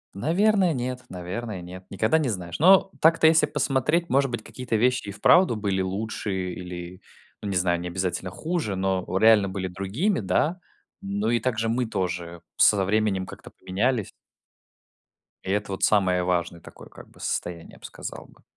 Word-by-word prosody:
Наверное, 185 - +2
нет, 125 0 -3
наверное, 95 +3 -5
нет. 90 +1 -10
Никогда 110 +10 +1
не 145 -5 0
знаешь, 90 -4 -5
но 190 +4 +6
так-то, 165 0 +5
если 160 0 +5
посмотреть, 150 +3 0
может 135 0 +2
быть, 120 -2 -4
какие-то 125 -3 -4
вещи 125 +1 +1
и - - -4
вправду 175 - +4
были 100 -3 -1
лучше 95 -1 -3
или, 90 0 -8 0.4
ну, 100 - -4
не 95 - -2
знаю, 90 -1 +1
не 90 - -5
обязательно 90 0 -3
хуже, 155 - -3
но 95 -1 0
реально 105 -2 +5
были 95 -1 -3
другими, 100 - -1
да. 130 - 0 0.4
Но 100 +3 -1
и 120 - +2
также 115 -3 -1
мы 120 +1 0
тоже 85 -4 -4 0.2
с - - +7
со 100 -2 +1
временем 100 -2 +1
как-то - - -11
поменялись. 110 +3 -1 1.3
И - - -5
это 105 0 -1
вот 95 - -5
самое 90 -4 +3
важное 85 -1 -1
такое - - -14
как - - -14
бы - - -20
состояние, 85 -1 -4
я - - -16
б - - -20
сказал - - -8
бы. - - -23
100 Hz, 175 wpm, -25 LUFS, 95-125 Hz, 1.3 s, с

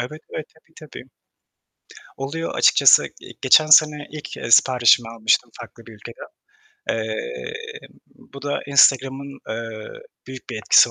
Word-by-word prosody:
Evet, 155 +6 -7
evet, 155 - -6
tabii, 160 0 -30 0.2
tabii. 130 - -12 1.1
Oluyor 150 +5 -5
açıkçası. - - +5 0.2
Eee, - - -13
geçen 155 +4 +4
sene 150 -1 +4
ilk, 150 -1 -9
eee, - - -7
siparişimi 120 -1 +4
almıştım 115 +1 0
farklı 115 0 -13
bir 115 - -13
ülkeden. 110 +2 -12 0.6
Eee, 475 -1 -5 0.5
bu 140 0 -16
da 145 0 -3
Instagram'ın, 135 0 +1
eee, 110 -1 -7 0.4
büyük 130 -1 -11
bir - - -6
etkisi 110 - +4
135 Hz, 130 wpm, -20 LUFS, 115-150 Hz, 1.1 s, açıkçası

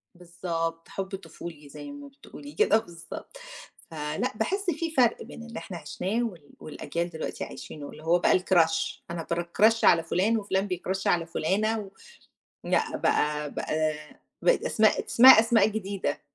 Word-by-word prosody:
بالضبط، 170 -1 -4
حُبّ 195 0 -4
طفولي 165 -4 -10
زي 290 - -9
ما 285 0 -10
بتقولي 285 +1 -12
كده 430 - +4
بالضبط، 175 - -9 0.5
فلأ، 150 -1 -2
باحِسّ 385 - -1
فيه 330 -2 -2
فَرْق 245 -4 +3
بين 230 - -10
اللي 230 -1 -7
إحنا 185 - -8
عِشناه، 190 +9 -2
وال 175 -10 -6
والأجيال 170 +3 -4
دلوقتي 160 -1 -5
عايشينه، 145 -2 -8
اللي 155 - -12
هو 170 +2 +3
بقى 180 - +4
الCrush 165 -3 +2
أنا 170 -2 -5
بCrush 205 +7 +2
على 165 -1 +6
فٌلان، 195 +7 +1
وفُلان 200 -1 -1
بيCrush 190 +2 -3
على 170 -1 +2
فُلانة، 205 +7 0
و 200 - -7 0.8
لأ، - - +1
بقى 150 0 0
بقى 155 0 -1 0.5
بقت - - +3
أسماء - - +3
ات 455 - -2
اسمها 255 - +9
أسماء 225 -1 +3
جديدة. 200 -7 -3
180 Hz, 155 wpm, -27 LUFS, 165-225 Hz, 0.8 s, اسمها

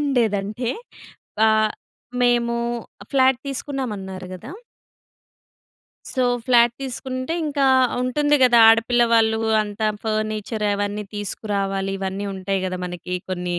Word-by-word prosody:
ఉండేదంటే 235 -4 0 0.8
ఆహ్, 215 0 +3 0.5
మేము 240 -1 +2 0.6
ఫ్లాట్ 260 -2 +4
తీసుకున్నాం 270 -2 -4
అన్నారు 190 -1 -7
గదా! 225 - -9 1.6
సో 255 - 0 0.2
ఫ్లాట్ 240 -1 +5
తీసుకుంటే 255 +3 -4
ఇంకా 285 -2 +1 0.3
ఉంటుంది 290 +4 +2
గదా 240 -2 +6
ఆడపిల్ల 230 +2 +4
వాళ్ళు 220 -1 +3 0.2
అంతా 210 +1 -3 0.2
ఫర్నిచర్ 215 0 -2
అవన్నీ 205 +1 -2
తీసుకురావాలి. 195 -1 -2
ఇవన్నీ 195 +1 -3
ఉంటాయి 190 +1 -2
గదా 185 0 -4
మనకి 180 0 -6
కొన్ని. 180 -1 -2
220 Hz, 105 wpm, -22 LUFS, 195-250 Hz, 1.6 s, గదా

